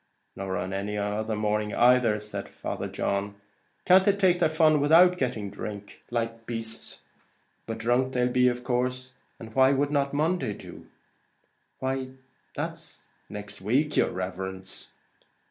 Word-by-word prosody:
"Nor 95 -1 -3
on 90 +2 -3
any 100 +2 -3
other 105 +2 -1
morning. 105 0 0
Can't 125 +4 +5
they 110 -3 +2 2.0
take 190 -3 +3
their 165 -3 +3
fun 155 -2 +4
without 170 +5 +6
getting 120 - -2
drunk, 100 0 -8
like 115 -1 -3
beasts? 115 -1 -6 0.7
But 115 - -3
drunk 120 +3 +1
they'll 125 0 +2
be, 125 0 +3
of 125 0 -1
course. 125 +1 -1 0.3
And 110 -1 -10
why 130 +2 +5
would 140 +1 +1
not 140 -1 +1
Monday 155 - 0
do?" - - -11 0.9
"Why 130 0 -3 0.4
that's - - -6 0.2
next 105 -2 -8
week, 135 +9 +1
yer - - +3
riverence!" 95 +1 -5
120 Hz, 130 wpm, -27 LUFS, 105-135 Hz, 2.0 s, without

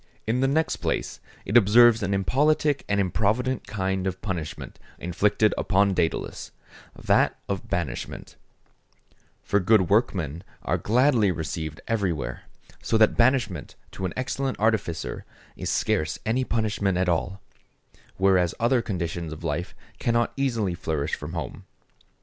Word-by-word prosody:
In 115 +3 0
the 135 - +3
next 155 +3 +1
place, - - -2 0.3
it 105 - -3
observes 120 +1 +6
an 100 -1 -1
impolitic 145 +8 +2
and 100 0 +2
improvident 110 +7 0
kind 95 -2 -1
of 95 0 -3
punishment 90 -7 -5 0.2
inflicted 100 +5 +1
upon 100 0 +2
Dædalus—that 85 -3 -2
of 100 -3 -3
banishment; 80 -9 -4 1.1
for 100 - +2
good 100 -1 +3
workmen 90 - +1 0.2
are - - 0
gladly 120 -2 +3
received 80 -2 -4
everywhere, 95 - -2 0.4
so 115 - +1
that 110 -1 +4
banishment 115 - +1 0.2
to 95 - -5
an 90 - -3
excellent 130 +1 -2
artificer 100 -7 -1 0.3
is - - -4
scarce 80 0 0
any 120 +4 +1
punishment 105 -6 0
at 90 0 +1
all; 90 +3 -1 0.8
whereas 95 -3 +3
other 120 +1 +3
conditions 85 -5 -4
of 80 +2 -8
life 80 +2 -3 0.2
cannot 120 0 +1
easily 115 -9 0
flourish 80 -3 -3
from 75 +3 -4
home. 80 -8 -6
100 Hz, 130 wpm, -25 LUFS, 85-115 Hz, 1.1 s, observes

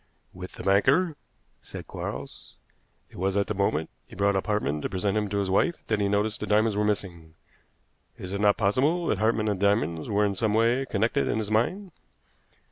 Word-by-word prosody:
"With 90 0 -9
the - - -9
banker," 140 - +3 0.5
said - - -9
Quarles. 70 +2 -7 0.6
"It - - -13
was 95 +2 0
at 100 - +2
the - - -3
moment 95 -6 -1
that - - -42
he - - -12
brought 100 +1 +2
up 95 - -1
Hartmann 75 -9 -1
to - - -3
present 95 +2 -1
him 105 -1 0
to 100 - -2
his 100 -2 -1
wife 170 - +2
that 110 -2 +1
he 100 - +1
noticed 105 +1 0
the 105 - -4
diamonds 110 0 +2
were 105 - +1
missing. 85 -6 -3 0.8
Is 95 +1 -7
it 100 - -2
not 105 -1 +4
possible 140 - +1
that - - 0
Hartmann 110 0 +1
and 100 -3 -1
the 100 - +3
diamonds 85 -5 0
were 105 0 +2
in 100 - 0
some 105 +2 0
way 120 +4 +2
connected 115 +7 +1
in - - 0
his 110 -1 -3
mind?" 180 - 0
105 Hz, 210 wpm, -26 LUFS, 95-110 Hz, 0.8 s, not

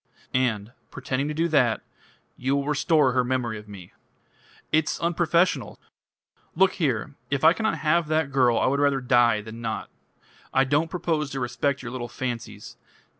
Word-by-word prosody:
"And, 115 -4 0 0.2
pretending 135 +1 -3
to 150 - -3
do 165 +2 +1
that, 125 -8 +2 0.5
you 135 +2 -1
will 140 0 -1
restore 145 -1 +2
her 125 0 +2
memory 120 -3 -2
of 105 - -14
me." 95 -4 -11 0.8
"It's 155 0 +1
unprofessional." 170 - +1 0.8
"Look 190 +3 +4
here! 135 -1 0 0.2
If 140 +1 -1
I 160 +1 +7
cannot 220 +3 -1
have 160 +1 +1
that 155 -2 0
girl 125 -3 +3
I - - +2
would 140 +2 +1
rather 140 -1 +2
die 120 -3 +3
than 110 +2 -9
not. 110 -1 -4 0.6
I 135 - +5
don't 145 +4 +1
propose 160 -4 -1
to 135 - -4
respect 130 +2 -1
your 120 - -6
little 120 -1 -5
fancies. 120 -1 -6
135 Hz, 165 wpm, -25 LUFS, 120-155 Hz, 0.8 s, I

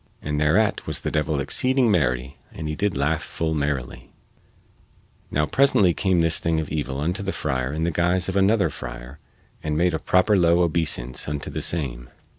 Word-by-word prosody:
And 75 0 -3
thereat 90 +8 +2
was - - 0
the - - -3
devil 75 -1 0
exceeding 130 - +2
merry 65 -6 0
and 80 - -6
he 75 - -3
did 100 0 -1
laugh 75 +3 0
full 80 -1 -3
merrily. 70 -4 -3 1.2
Now 75 +1 +1
presently 100 - +3
came 95 -2 +1
this 80 0 +2
thing 80 -1 0
of 80 - -4
evil 70 -3 -3
unto 85 +6 -1
the 95 -1 -2
friar 65 -6 -2
in 80 +2 -3
the 85 - +1
guise 90 +2 +1
of 95 - -3
another 100 +2 +3
friar - - -9 0.4
and 75 -1 -2
made 90 +1 +2
a 80 - -1
proper 95 +5 +3
low 85 -1 +4
obeisance 75 -7 -1
unto 75 -1 -4
the - - -4
same. 60 -8 -2
80 Hz, 185 wpm, -23 LUFS, 70-90 Hz, 1.2 s, low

